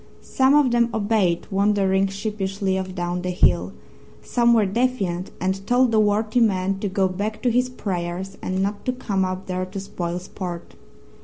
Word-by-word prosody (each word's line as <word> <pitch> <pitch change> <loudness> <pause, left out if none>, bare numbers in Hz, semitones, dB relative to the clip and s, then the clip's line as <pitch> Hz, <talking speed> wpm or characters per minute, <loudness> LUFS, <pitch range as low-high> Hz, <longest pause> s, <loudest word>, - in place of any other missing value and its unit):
Some 265 +2 +3
of 290 -4 +4
them 235 0 +3
obeyed, 205 -5 +1
wandering 195 -1 +2
sheepishly 195 -1 -2
off 190 -1 -4
down 175 0 -2
the 180 - -3
hill; 90 - +2 0.5
some 235 -1 +2
were 215 -2 +4
defiant 195 -5 -1
and 190 +1 -1
told 245 0 +3
the 220 - +3
worthy 215 +2 +2
man 195 -3 +1
to 205 - -2
go 190 0 +1
back 205 +4 -3
to 245 - +3
his 250 +2 +2
prayers 185 -4 -4
and 185 +1 -1
not 205 +1 -3
to 255 - 0
come 200 -6 -1
up 185 +1 -3
there 185 0 -2
to 195 +1 -6
spoil 175 -3 -4
sport. 180 -1 -7
195 Hz, 175 wpm, -23 LUFS, 185-220 Hz, 0.5 s, of